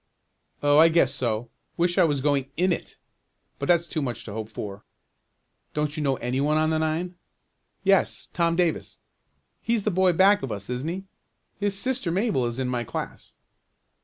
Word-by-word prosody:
"Oh, 145 +1 +5
I 160 - +8
guess 160 -5 +3
so. 115 -1 -2 0.3
Wish 175 +1 +1
I - - +6
was 145 -4 0
going 140 -1 +1
in 180 +1 +3
it, - - -6 0.6
but 140 - -3
that's 170 -1 +4
too 160 -2 -3
much 120 -4 -4
to 105 - -7
hope 110 0 -5
for." 100 -2 -7 0.9
"Don't 150 0 -1
you 155 - -3
know 135 -2 +1
any 125 +2 -2
one 150 +2 +2
on 155 0 +2
the 160 - +1
nine?" 160 +3 -1 0.7
"Yes, 195 -1 +2
Tom 170 -1 +1
Davis." 175 -2 -1 0.6
"He's 230 -3 0
the 210 - +1
boy 185 0 +3
back 195 +4 +5
of 135 - -4
us, 100 +3 -5
isn't 125 +6 -2
he? 185 +3 -4 0.6
His 205 -1 0
sister 255 -3 0
Mabel 185 - +1
is 120 0 -4
in 130 -1 -1
my 125 -1 -1
class." - - -7
155 Hz, 185 wpm, -25 LUFS, 130-180 Hz, 0.9 s, I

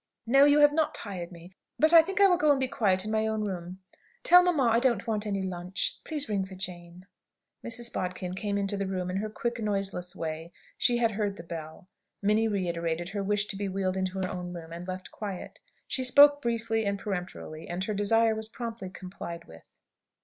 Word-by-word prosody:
"No; 275 +4 +6
you 290 +1 +5
have 290 0 +6
not 315 0 +1
tired 185 -5 -5
me. 175 +1 -12 0.3
But 310 +2 +4
I 330 - +11
think 385 +5 -4
I 400 - +8
will 370 -2 +5
go 305 - +3
and 285 -2 +4
be 260 - +1
quiet 205 -5 +1
in 215 - -3
my 220 0 +1
own 220 -1 -1
room. 185 -2 -5 0.4
Tell 360 +1 +8
mamma 350 -6 +2
I 230 -1 +4
don't 240 -5 +1
want 215 -2 -1
any 200 -2 -1
lunch. 180 +1 -2
Please 300 -3 -2
ring 205 -3 0
for 190 0 -9
Jane." 180 -1 -7 0.6
Mrs. 235 0 -2
Bodkin 180 0 -3
came 200 +1 -2
into 200 0 -1
the 200 -1 -2
room 185 -1 -2
in 185 - -2
her 215 +2 -2
quick, 235 +2 -3
noiseless 195 -4 -2
way. 160 +1 -5 0.2
She 240 - +2
had 230 -1 +2
heard 205 -1 -2
the 165 - -8
bell. 165 0 -8 0.3
Minnie 210 +2 +2
reiterated 170 -4 -2
her 200 0 -3
wish 205 +1 +1
to 205 - -5
be 200 0 -3
wheeled 190 -1 -1
into 190 0 -2
her 190 -1 -1
own 180 -1 -5
room, 165 -1 -8
and 175 +2 -7
left 185 0 -6
quiet. 200 -4 -7 0.3
She 260 - -1
spoke 285 +3 +7
briefly 230 -2 -1
and 200 -1 -1
peremptorily, 180 -5 -6
and 175 +2 -2
her 215 - -2
desire 225 +2 +3
was 220 0 -4
promptly 230 -4 -6
complied 180 -2 -8
with. 80 0 -15
200 Hz, 215 wpm, -28 LUFS, 180-230 Hz, 0.6 s, I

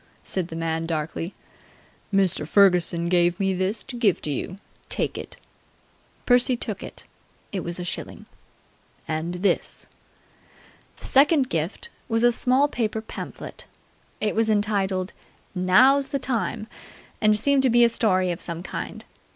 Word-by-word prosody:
said 185 -3 -2
the 165 - -8
man 165 0 -2
darkly. 165 +2 -3 0.8
"Mr. 190 -6 +2
Ferguson 175 -3 +4
give 175 0 +2
me 195 -1 +1
this 190 +4 -1
to 265 - -7
give 225 -6 +2
to 150 - -3
you. 175 +7 -4 0.3
Take - - -1
it!" - - -8 0.9
Percy 245 0 +4
took 215 -4 -3
it. - - -8 0.5
It 195 - -2
was 170 -1 -4
a 180 - -4
shilling. 175 - -5 0.8
"And 160 +2 -2
this." 200 - 0 1.1
The - - -11
second 275 -1 +4
gift 170 - -3 0.2
was 225 0 +1
a 240 - +6
small 260 +4 +3
paper 225 -5 -2
pamphlet. - - -8 0.5
It 215 - 0
was 225 0 +1
entitled 200 -3 0 0.4
"Now's 250 +10 +4
the 280 - -2
Time!" 250 -4 -2 0.6
and 215 0 +4
seemed 275 +5 +3
to 265 - +3
be 240 0 +5
a - - +7
story 185 -6 +1
of 170 - -5
some 170 0 -5
kind. - - -6
200 Hz, 145 wpm, -24 LUFS, 175-240 Hz, 1.1 s, a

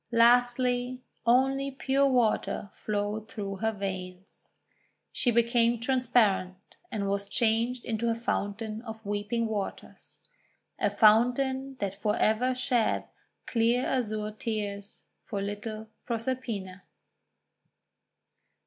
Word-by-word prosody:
Lastly 245 +1 +3 0.3
only 270 +3 +3
pure 275 +1 +1
water 235 -5 +1
flowed 210 +1 -3
through 200 -2 -5
her 220 +2 0
veins. 190 -2 -7 0.6
She 245 - 0
became 235 0 +3
transparent, 230 -7 +2 0.4
and 205 -3 -2
was 200 0 -2
changed 235 +2 +1
into 230 +1 -1
a 230 - +1
Fountain 220 -1 -3
of 225 -2 -9
Weeping 205 +3 -1
Waters 210 -3 -5 0.3
— - - -42
a - - +2
fountain 260 +5 +3
that 200 -6 -3
for 210 +1 -1
ever 250 +4 +2
sheds 250 -3 +1 0.4
clear 235 +2 +2
azure 215 -4 -1
tears 210 -2 -5 0.2
for 205 - -4
little 215 +2 -5 0.2
Proserpina. 230 -5 -3
225 Hz, 105 wpm, -29 LUFS, 205-245 Hz, 0.6 s, Lastly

